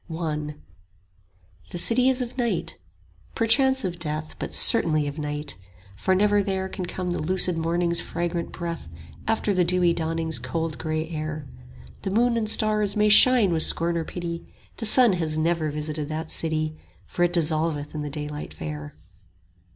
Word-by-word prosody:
I 155 Hz, -2 st, -3 dB, 1.1 s
The -, -, -6 dB
City 245 Hz, +8 st, +3 dB
is 260 Hz, -1 st, +1 dB
of 245 Hz, 0 st, -8 dB
Night; 240 Hz, -2 st, -2 dB, 0.6 s
perchance 265 Hz, +2 st, +3 dB
of 175 Hz, -2 st, -4 dB
Death 155 Hz, -1 st, -2 dB
But -, -, -4 dB
certainly 155 Hz, -10 st, +4 dB
of 145 Hz, +2 st, -5 dB
Night; 150 Hz, -1 st, -2 dB, 0.4 s
for 190 Hz, -, +1 dB
never 205 Hz, +1 st, +3 dB
there 190 Hz, -1 st, -2 dB
Can 185 Hz, -1 st, -5 dB
come 180 Hz, 0 st, -3 dB
the 175 Hz, -, -2 dB
lucid 180 Hz, +2 st, +1 dB
morning's 170 Hz, +1 st, 0 dB
fragrant 170 Hz, 0 st, -3 dB
breath 170 Hz, -, -5 dB, 0.4 s
After 220 Hz, -2 st, +1 dB
the 185 Hz, -1 st, +3 dB
dewy 175 Hz, 0 st, +3 dB
dawning's 160 Hz, -1 st, -2 dB
cold 165 Hz, -2 st, -3 dB
grey 155 Hz, 0 st, -2 dB
air: 155 Hz, -2 st, -5 dB, 0.5 s
The 195 Hz, -, -3 dB
moon 235 Hz, +4 st, +2 dB
and 220 Hz, -2 st, 0 dB
stars 215 Hz, -2 st, +3 dB
may 210 Hz, 0 st, +3 dB
shine 225 Hz, -2 st, +7 dB
with 160 Hz, -, +1 dB
scorn 170 Hz, +2 st, +2 dB
or 165 Hz, -, 0 dB
pity 170 Hz, 0 st, -5 dB
5 -, -, -22 dB, 0.2 s
The 225 Hz, -, -4 dB
sun 240 Hz, -1 st, +5 dB
has 160 Hz, -3 st, -1 dB
never 160 Hz, 0 st, +1 dB
visited 150 Hz, 0 st, -4 dB
that 160 Hz, +1 st, -4 dB
city, 155 Hz, -1 st, -1 dB, 0.3 s
For -, -, -5 dB
it 175 Hz, 0 st, +2 dB
dissolveth 155 Hz, -3 st, 0 dB
in 155 Hz, -, -4 dB
the 150 Hz, -, -4 dB
daylight 150 Hz, -, -6 dB
fair. 75 Hz, -1 st, -7 dB
170 Hz, 165 wpm, -25 LUFS, 155-195 Hz, 1.1 s, shine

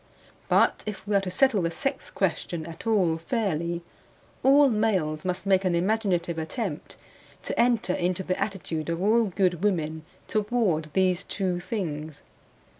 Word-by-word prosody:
But -, -, +3 dB
if 205 Hz, -1 st, -6 dB
we 205 Hz, -, +1 dB
are 200 Hz, -, +4 dB
to 190 Hz, -, -4 dB
settle 225 Hz, +2 st, +3 dB
the 170 Hz, -, 0 dB
sex 270 Hz, +10 st, -3 dB
question 170 Hz, -3 st, -2 dB
at 165 Hz, +6 st, -9 dB
all 185 Hz, -7 st, +3 dB
fairly, 170 Hz, -4 st, -1 dB, 0.6 s
all 280 Hz, +2 st, +6 dB
males 195 Hz, -, 0 dB
must 180 Hz, +1 st, -2 dB
make 195 Hz, -1 st, +3 dB
an 180 Hz, -2 st, +1 dB
imaginative 175 Hz, -3 st, 0 dB
attempt 160 Hz, -, -4 dB, 0.5 s
to -, -, -3 dB
enter 235 Hz, -6 st, +3 dB
into 180 Hz, +1 st, -1 dB
the 185 Hz, 0 st, -2 dB
attitude 170 Hz, -6 st, -3 dB
of 165 Hz, 0 st, -1 dB
all 220 Hz, +4 st, +3 dB
good 185 Hz, -2 st, 0 dB
women 160 Hz, -6 st, 0 dB, 0.3 s
toward 210 Hz, -8 st, 0 dB
these 185 Hz, -1 st, +2 dB
two 185 Hz, -3 st, -2 dB
things. 160 Hz, -6 st, -5 dB
185 Hz, 150 wpm, -26 LUFS, 170-215 Hz, 0.6 s, all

